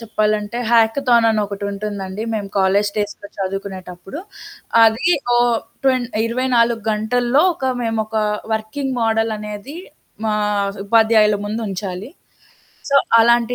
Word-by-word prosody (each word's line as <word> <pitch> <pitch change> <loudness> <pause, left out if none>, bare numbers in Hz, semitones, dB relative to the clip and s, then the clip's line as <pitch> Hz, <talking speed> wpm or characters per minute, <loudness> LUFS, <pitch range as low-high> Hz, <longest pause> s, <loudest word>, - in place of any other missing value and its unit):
చెప్పాలంటే 215 0 -1
హ్యాకథాన్ 235 +1 +4
అని 220 -1 +1
ఒకటుంటుందండి 200 0 -5
మేము 205 -2 -3
కాలేజీ 195 +2 +2
డేస్‌లో 205 -1 -3
చదువుకునేటప్పుడు. 190 - -6 0.6
అది 225 +7 +4 0.3
ఓ - - +4 0.5
ట్వెన్ 255 -2 +3 0.2
24 235 -1 +1
గంటల్లో 240 +6 +1
ఒక 265 -3 -1
మేమొక 225 -1 -2 0.4
వర్కింగ్ 220 +5 -3
మోడల్ 225 0 +1
అనేది 210 +7 -7 0.5
మా 215 -1 +1 0.5
ఉపాధ్యాయుల 220 -1 +4
ముందుంచాలి. 205 0 -4 0.8
సో, 280 - +5 0.2
అలాంటి 235 +1 +3
220 Hz, 100 wpm, -19 LUFS, 205-235 Hz, 0.8 s, సో